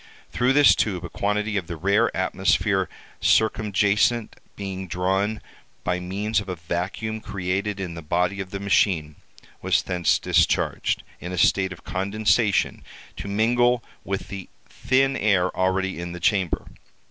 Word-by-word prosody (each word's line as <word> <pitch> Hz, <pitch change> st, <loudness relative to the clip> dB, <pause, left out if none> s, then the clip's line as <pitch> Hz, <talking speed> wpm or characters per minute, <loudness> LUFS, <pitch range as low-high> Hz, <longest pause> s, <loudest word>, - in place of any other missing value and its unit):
Through 125 Hz, +2 st, +2 dB
this 145 Hz, 0 st, +7 dB
tube 95 Hz, -4 st, -1 dB
a -, -, -6 dB
quantity 105 Hz, +1 st, -1 dB
of 90 Hz, -4 st, -3 dB
the 85 Hz, -, -5 dB
rare 100 Hz, +7 st, +2 dB
atmosphere 95 Hz, +1 st, +1 dB, 0.3 s
circumjacent 110 Hz, +1 st, +2 dB, 0.2 s
being 95 Hz, -2 st, -5 dB
drawn 95 Hz, +5 st, -1 dB, 0.4 s
by 90 Hz, 0 st, 0 dB
means 100 Hz, +4 st, -1 dB
of 100 Hz, -2 st, -7 dB
a 90 Hz, -, -2 dB
vacuum 90 Hz, +6 st, -3 dB
created 100 Hz, +1 st, -2 dB
in 90 Hz, -3 st, -4 dB
the 85 Hz, -, -7 dB
body 90 Hz, +5 st, 0 dB
of 95 Hz, -1 st, -5 dB
the 100 Hz, -, -5 dB
machine, 90 Hz, -6 st, +1 dB, 0.5 s
was -, -, +2 dB
thence 90 Hz, -2 st, +1 dB
discharged, -, -, +1 dB, 0.2 s
in 90 Hz, -, -6 dB
a 90 Hz, -, -4 dB
state 95 Hz, +2 st, +3 dB
of 90 Hz, -, -10 dB
condensation, 105 Hz, +2 st, +1 dB, 0.3 s
to -, -, -7 dB
mingle 120 Hz, +4 st, +2 dB, 0.2 s
with 100 Hz, -1 st, -4 dB
the 95 Hz, -2 st, -7 dB, 0.2 s
thin 135 Hz, +1 st, +1 dB
air 95 Hz, -6 st, +2 dB
already 95 Hz, 0 st, 0 dB
in 85 Hz, 0 st, -5 dB
the 90 Hz, -, -7 dB
chamber. 90 Hz, 0 st, +1 dB
100 Hz, 145 wpm, -24 LUFS, 90-105 Hz, 0.5 s, this